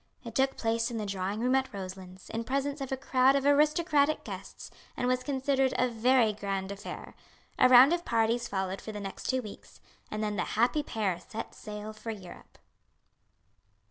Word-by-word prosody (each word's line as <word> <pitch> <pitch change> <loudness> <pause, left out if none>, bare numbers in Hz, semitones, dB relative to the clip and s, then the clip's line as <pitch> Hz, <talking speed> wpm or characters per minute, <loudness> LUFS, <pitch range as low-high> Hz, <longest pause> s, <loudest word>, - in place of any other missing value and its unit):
It 230 -3 -8
took 270 +2 +1
place 230 +1 0
in 235 - -4
the 215 - -3
drawing 200 +2 -3
room 250 +2 +2
at 265 0 +1
Roselands, 185 -2 -8
in 225 +1 -2
presence 275 +3 -2
of 270 - -4
a 265 - -1
crowd 265 0 +3
of 275 0 0
aristocratic 300 +1 +3
guests, - - -8 0.3
and 245 - 0
was 255 0 +1
considered 270 -1 0
a 250 - +3
very 240 -1 +3
grand 195 -1 -3
affair. 200 +1 -8 0.5
A 255 - +6
round 255 +5 +8
of 345 0 -1
parties 230 -1 +1
followed 190 -1 -3
for 220 - -7
the 210 - -6
next 195 -1 -6
two 260 -1 +1
weeks, 210 - -11 0.3
and 215 0 -3
then 210 -1 -2
the 180 - +1
happy 245 +6 +3
pair 205 -10 -2
set 220 - -7
sail 210 0 -7
for 215 +2 -8
Europe. 195 -5 -9
230 Hz, 185 wpm, -29 LUFS, 205-265 Hz, 0.5 s, round